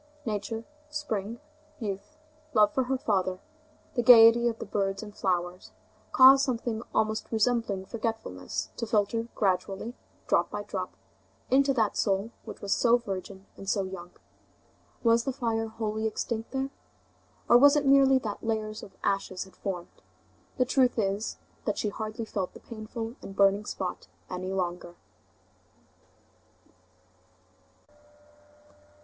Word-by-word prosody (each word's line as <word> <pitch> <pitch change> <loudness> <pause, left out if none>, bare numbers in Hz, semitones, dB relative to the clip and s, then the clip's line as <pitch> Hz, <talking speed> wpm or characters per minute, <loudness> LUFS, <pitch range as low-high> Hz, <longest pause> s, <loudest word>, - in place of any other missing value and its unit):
Nature, 220 +1 -3 0.2
spring, 230 -8 -3 0.4
youth, 215 +7 -5 0.4
love 210 -1 +5
for 260 - +1
her 265 +1 0
father, 185 -5 0 0.5
the 240 - +1
gayety 235 0 +8
of 230 -1 -1
the - - -6
birds 195 0 -1
and 210 -1 -10
flowers, 180 -1 -2 0.4
caused 270 +1 +8
something 235 -4 -1
almost 215 0 0
resembling 225 -4 +1
forgetfulness 220 - -4
to 230 - -3
filter 225 +1 +1
gradually, 195 +3 -1 0.3
drop - - +2
by - - -4
drop, - - -5 0.6
into 275 +1 +5
that 225 -6 +1
soul, 200 +2 0
which - - -9
was 200 - +1
so 240 0 +4
virgin 195 -3 -6
and 195 - -7
so 200 -1 +1
young. 185 -2 -7 0.9
Was 230 0 +4
the 270 - -1
fire 230 -4 -1
wholly 220 0 -2
extinct 225 +1 -3
there? 270 0 -2 0.8
Or 240 - +7
was 285 +2 +7
it 290 -1 +2
merely 270 -1 +6
that 215 -5 -4
layers 215 -1 -2
of 190 - -13
ashes 195 -2 -1
had 190 - -17
formed? 180 -4 -6 0.6
The 255 - +3
truth 255 -1 +2
is, 200 0 -1 0.3
that 210 - -1
she 210 - 0
hardly 220 +2 -5
felt 195 -4 -3
the - - -10
painful 225 +2 -7
and 195 - -9
burning 200 +1 +4
spot 185 -3 -4 0.2
any 185 +1 -4
longer. 175 -2 -3
220 Hz, 135 wpm, -28 LUFS, 195-235 Hz, 0.9 s, gayety